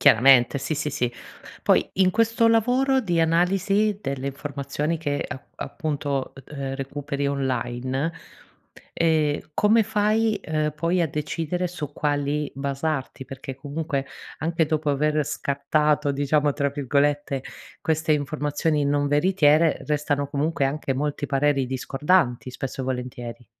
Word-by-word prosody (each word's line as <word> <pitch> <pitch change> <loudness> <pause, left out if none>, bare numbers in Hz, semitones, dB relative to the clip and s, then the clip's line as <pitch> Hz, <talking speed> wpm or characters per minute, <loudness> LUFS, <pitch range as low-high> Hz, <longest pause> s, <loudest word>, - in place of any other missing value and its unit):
Chiaramente 130 +3 +6
sì, 155 - -2
sì, 150 +1 -2
sì. 125 -4 -1 0.5
Poi - - +3
in 185 -1 +4
questo 230 +2 +3
lavoro 250 +4 +3
di 175 -7 0
analisi 195 +5 +2
delle 135 -1 -3
informazioni 145 +3 -3
che 145 -2 -2
app 130 - -9
appunto, 145 -3 -3
ehm, 135 -2 -5
recuperi 140 +1 -3
online, 130 +2 -1 0.8
ehm, 155 -3 +1
come 215 +4 +4
fai, 220 +1 +2
ehm, 155 -1 -1
poi 170 +4 0
a - - +2
decidere 165 +4 -2
su 150 -5 -6
quali 145 0 -1
basarti? 140 0 -3
Perché 135 0 -7
comunque 145 +1 -3 0.3
anche 165 +1 0
dopo 155 -1 0
aver 150 +1 +1
"scattato", 145 +2 +1
diciamo, 145 +1 +2
tra 140 0 0
virgolette, 140 0 0 0.4
queste 160 0 0
informazioni 150 +1 0
non 145 0 +1
veritiere 155 0 +3
restano 145 -1 0
comunque 145 0 0
anche 135 0 -1
molti 145 +1 -2
pareri 140 -1 +2
discordanti 130 +1 +1
spesso 130 +1 -5
e - - -2
volentieri. 125 -2 -5
145 Hz, 125 wpm, -24 LUFS, 140-160 Hz, 0.8 s, Chiaramente